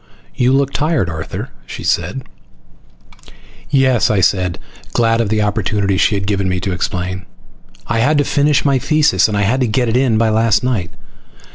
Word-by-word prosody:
"You 125 Hz, +1 st, +1 dB
look 140 Hz, 0 st, +1 dB
tired, 150 Hz, -, 0 dB
Arthur," 80 Hz, 0 st, -6 dB, 0.2 s
she -, -, -8 dB
said. -, -, -1 dB, 1.5 s
"Yes," 130 Hz, -4 st, +2 dB
I 105 Hz, -, +1 dB
said, 90 Hz, -2 st, +1 dB, 0.4 s
glad 115 Hz, -1 st, +2 dB
of 110 Hz, -, -1 dB
the 110 Hz, 0 st, +1 dB
opportunity 105 Hz, -1 st, 0 dB
she 100 Hz, +2 st, +2 dB
had 100 Hz, -1 st, -2 dB
given 100 Hz, -2 st, -1 dB
me 90 Hz, 0 st, -1 dB
to 95 Hz, -, -2 dB
explain. 95 Hz, +1 st, -3 dB, 0.6 s
"I 115 Hz, +2 st, -1 dB
had 145 Hz, +6 st, +2 dB
to 145 Hz, -, +3 dB
finish 145 Hz, +1 st, +1 dB
my 140 Hz, -2 st, +2 dB
thesis 155 Hz, +1 st, +2 dB
and 110 Hz, +4 st, 0 dB
get 120 Hz, +1 st, +1 dB
it 110 Hz, -, -1 dB
in 125 Hz, -4 st, +2 dB
by 115 Hz, 0 st, +2 dB
last 110 Hz, 0 st, +2 dB
night. 115 Hz, -9 st, -1 dB
110 Hz, 165 wpm, -16 LUFS, 100-130 Hz, 1.5 s, to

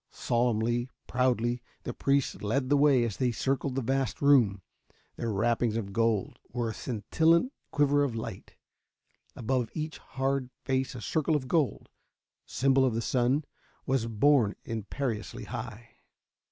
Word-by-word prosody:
Solemnly, 120 Hz, +1 st, 0 dB, 0.2 s
proudly, 125 Hz, -1 st, +1 dB, 0.2 s
the -, -, -4 dB
priests 140 Hz, -1 st, +1 dB
lead 130 Hz, +5 st, 0 dB
the 145 Hz, -, +5 dB
way 140 Hz, -3 st, +5 dB
as 115 Hz, -4 st, -2 dB
they 125 Hz, -2 st, +1 dB
circled 135 Hz, +2 st, -1 dB
the 135 Hz, -, -1 dB
vast 135 Hz, -2 st, -1 dB
room. 120 Hz, -10 st, +4 dB, 0.5 s
Their 115 Hz, -, -2 dB
wrappings 115 Hz, +2 st, +1 dB
of 100 Hz, -3 st, -4 dB
gold 115 Hz, -2 st, 0 dB
were 120 Hz, -2 st, -1 dB
a -, -, -6 dB
scintillant 160 Hz, -, +1 dB, 0.2 s
quiver 145 Hz, -1 st, +3 dB
of 130 Hz, -5 st, -1 dB
light; 110 Hz, -, -7 dB, 0.8 s
above 120 Hz, 0 st, -1 dB
each 155 Hz, 0 st, -4 dB
hard 135 Hz, -1 st, -2 dB, 0.2 s
face 130 Hz, -1 st, 0 dB
a 120 Hz, -, -7 dB
circle 155 Hz, +5 st, 0 dB
of 135 Hz, -3 st, -2 dB
gold 150 Hz, -1 st, 0 dB, 0.6 s
symbol 135 Hz, 0 st, +3 dB
of 125 Hz, -4 st, +2 dB
the -, -, 0 dB
sun 130 Hz, +5 st, +1 dB, 0.4 s
was 130 Hz, -3 st, 0 dB
borne 115 Hz, -1 st, +3 dB
imperiously 115 Hz, +1 st, -4 dB
high. 115 Hz, +1 st, -8 dB
125 Hz, 140 wpm, -29 LUFS, 115-140 Hz, 0.8 s, the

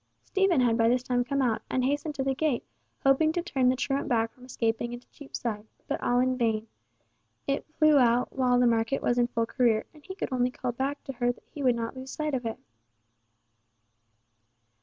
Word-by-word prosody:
Stephen 385 Hz, -7 st, +2 dB
had 235 Hz, -2 st, +3 dB
by 230 Hz, 0 st, +4 dB
this 250 Hz, +1 st, +2 dB
time 245 Hz, -1 st, +1 dB
come 275 Hz, +1 st, 0 dB
out, 230 Hz, -3 st, +1 dB
and 255 Hz, -1 st, 0 dB
hastened 290 Hz, +2 st, -1 dB
to 270 Hz, -, -1 dB
the 270 Hz, 0 st, +1 dB
gate, 280 Hz, -3 st, 0 dB, 0.4 s
hoping 275 Hz, +4 st, +4 dB
to 350 Hz, -, -1 dB
turn 270 Hz, -7 st, +1 dB
the 255 Hz, -, +3 dB
truant 270 Hz, +1 st, -1 dB
back 225 Hz, -1 st, +1 dB
from 250 Hz, -, -19 dB
escaping 235 Hz, -1 st, -1 dB
into 240 Hz, +1 st, -9 dB
Cheapside; 230 Hz, -7 st, -5 dB, 0.2 s
but -, -, -2 dB
all 245 Hz, 0 st, +2 dB
in 255 Hz, 0 st, +1 dB
vain, 220 Hz, -2 st, +1 dB, 0.8 s
it 275 Hz, -, -2 dB
flew 310 Hz, -2 st, +6 dB
out 245 Hz, 0 st, +2 dB
while 250 Hz, -2 st, +3 dB
the 250 Hz, -, +4 dB
market 230 Hz, +3 st, +1 dB
was 245 Hz, 0 st, +2 dB
in 240 Hz, -, +3 dB
full 230 Hz, -1 st, -1 dB
career, 230 Hz, -3 st, +1 dB
and 305 Hz, -2 st, -18 dB
he 380 Hz, -, -8 dB
could 405 Hz, -, -3 dB
only 250 Hz, 0 st, +2 dB
call 250 Hz, -2 st, -3 dB
back 270 Hz, +4 st, -3 dB
to 270 Hz, -, -6 dB
her 245 Hz, 0 st, +1 dB
that 245 Hz, -, -16 dB
he 295 Hz, -, -7 dB
would 250 Hz, -3 st, +3 dB
not 230 Hz, +2 st, -4 dB
lose 260 Hz, 0 st, -8 dB
sight 305 Hz, +1 st, -3 dB
of 250 Hz, -3 st, -1 dB
it. 225 Hz, -, -4 dB
250 Hz, 210 wpm, -28 LUFS, 240-275 Hz, 0.8 s, flew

